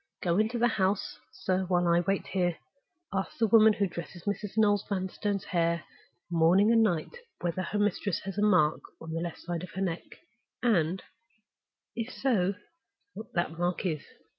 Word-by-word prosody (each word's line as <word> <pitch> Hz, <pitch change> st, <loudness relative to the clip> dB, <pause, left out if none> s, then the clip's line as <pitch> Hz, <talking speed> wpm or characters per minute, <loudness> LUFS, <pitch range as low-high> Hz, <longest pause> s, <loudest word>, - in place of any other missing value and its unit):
Go 175 Hz, +1 st, +2 dB
into 220 Hz, +3 st, +1 dB
the 240 Hz, +1 st, +4 dB
house, 195 Hz, -3 st, 0 dB
sir, 190 Hz, 0 st, -1 dB
while 175 Hz, -1 st, +2 dB
I 170 Hz, 0 st, +4 dB
wait 195 Hz, +3 st, 0 dB
here. 175 Hz, -3 st, 0 dB, 0.6 s
Ask 195 Hz, 0 st, -2 dB
the 230 Hz, -, +3 dB
woman 220 Hz, 0 st, +6 dB
who 205 Hz, -, +1 dB
dresses 170 Hz, -1 st, -7 dB
Mrs. 205 Hz, 0 st, -3 dB
Noel 205 Hz, -2 st, +4 dB
Vanstone's 195 Hz, +1 st, -2 dB
hair 170 Hz, -3 st, 0 dB, 0.4 s
morning 175 Hz, +5 st, +4 dB
and 230 Hz, -1 st, +5 dB
night 190 Hz, -, 0 dB, 0.2 s
whether 175 Hz, +1 st, -1 dB
her 185 Hz, +3 st, -3 dB
mistress 205 Hz, -2 st, 0 dB
has 195 Hz, 0 st, -6 dB
a 205 Hz, -, -1 dB
mark 180 Hz, -8 st, +4 dB, 0.2 s
on 160 Hz, -, -8 dB
the 165 Hz, +1 st, -2 dB
left 175 Hz, -1 st, -4 dB
side 175 Hz, -1 st, -4 dB
of 180 Hz, -, -7 dB
her 190 Hz, -, -3 dB
neck, 175 Hz, -3 st, -1 dB, 0.6 s
and 190 Hz, -6 st, +2 dB, 0.9 s
(if 235 Hz, +2 st, -3 dB
so) 200 Hz, -8 st, +1 dB, 0.6 s
what 220 Hz, -, -9 dB
that 170 Hz, -1 st, -1 dB
mark 175 Hz, +2 st, -1 dB
is?" 155 Hz, -5 st, -1 dB
190 Hz, 170 wpm, -29 LUFS, 175-205 Hz, 0.9 s, woman